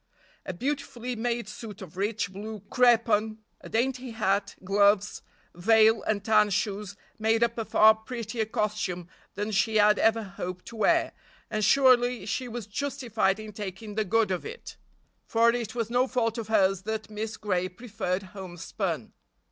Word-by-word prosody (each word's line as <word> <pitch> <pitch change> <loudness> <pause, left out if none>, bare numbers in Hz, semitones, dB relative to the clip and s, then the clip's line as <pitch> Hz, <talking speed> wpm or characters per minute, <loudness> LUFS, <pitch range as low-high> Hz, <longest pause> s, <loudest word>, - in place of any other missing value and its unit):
A - - -3
beautifully 250 +2 -3
made 235 -1 -2
suit 210 -1 -9
of 185 -5 -10
rich, 205 0 -2
blue 210 +1 -7
crepon, 230 -3 +3 0.2
a - - -11
dainty 255 +2 -1
hat, 200 -3 0
gloves, 200 +1 +2 0.3
veil 220 +4 +4
and 210 -1 -2
tan 215 -2 +4
shoes 200 0 -2 0.2
made 225 +1 +2
up 235 0 +1
a 225 - -3
far 220 +1 +6
prettier 225 0 -4
costume 205 -5 -2 0.3
than 205 +2 -3
she 215 +2 +1
had 210 0 +5
ever 225 0 +3
hoped 180 -2 -7
to 235 - -11
wear, 210 - +3 0.4
and 215 -1 -1
surely 245 -2 +4
she 250 +4 -2
was 235 -2 -6
justified 225 -4 -1
in 215 0 -8
taking 205 +1 -7
the 215 +1 0
good 215 0 +1
of 185 - -2
it, 475 +1 -9 0.5
for 230 +1 +4
it 235 -1 -4
was 230 -1 -2
no 250 +2 +3
fault 235 -2 0
of 225 - -5
hers 195 -4 +3
that 220 +1 -4
Miss 215 +1 -4
Gray 185 -3 -1
preferred 195 -2 -3
homespun. 185 -4 -5
215 Hz, 160 wpm, -27 LUFS, 200-235 Hz, 0.5 s, far